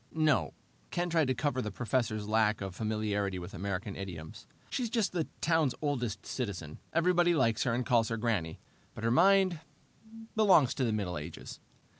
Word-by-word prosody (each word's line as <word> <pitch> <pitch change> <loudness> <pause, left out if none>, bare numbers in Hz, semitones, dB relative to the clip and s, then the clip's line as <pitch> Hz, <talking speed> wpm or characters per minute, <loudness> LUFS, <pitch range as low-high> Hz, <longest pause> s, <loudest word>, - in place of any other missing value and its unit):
"No." 155 -3 +2 0.3
Ken 175 0 -2
tried 160 -4 +3
to 130 - +1
cover 130 +1 0
the 105 - -3
professor's 110 -2 -1
lack 110 -1 +2
of 95 -2 -5
familiarity 105 -2 -1
with 90 +1 -7
American 100 +1 -4
idioms. 85 -5 -8 0.2
"She's 245 -3 -1
just 220 -5 +1
the 170 -3 -1
town's 160 -5 +2
oldest 120 -9 -2
citizen. 95 - -5
Everybody 175 +1 +3
likes 115 -6 +2
her 120 -3 +1
and 125 0 -1
calls 115 -4 +3
her 115 - -1
Granny, 105 -9 -1 0.4
but 105 - -7
her 115 - +2
mind 190 +4 +4 0.8
belongs 190 - +5
to 135 - -1
the 115 - +1
Middle 95 -6 -2
Ages." 80 +2 -8
115 Hz, 170 wpm, -31 LUFS, 100-155 Hz, 0.8 s, belongs